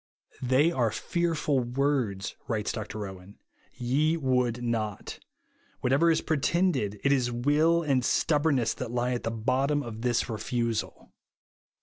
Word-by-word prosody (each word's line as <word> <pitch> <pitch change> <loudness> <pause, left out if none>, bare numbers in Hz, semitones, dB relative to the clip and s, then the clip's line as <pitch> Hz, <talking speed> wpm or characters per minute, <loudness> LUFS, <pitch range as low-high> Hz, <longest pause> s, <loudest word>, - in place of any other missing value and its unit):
They 130 +6 +3
are 120 -8 +1
fearful 160 - 0
words," 125 -5 -1
writes 110 -3 -1
Dr 110 -1 -5
Owen, 95 +1 -11
" - - -40
' - - -36 0.2
ye 155 +4 +3
would 125 -4 0
not' 110 -4 -3 0.6
Whatever 140 +7 +3
is 165 - +2
pretended, 150 - 0
it 140 - +3
is 130 -3 +2
luill 150 +8 +2
and 135 -3 +3
stuhhornness 145 -4 +2
that 125 - -4
lie 120 +1 0
at 120 - -2
the - - -2
bottom 130 +6 0
of 115 -2 -7
this 120 -1 +1
refusal." 115 0 -3
125 Hz, 140 wpm, -28 LUFS, 115-145 Hz, 0.6 s, They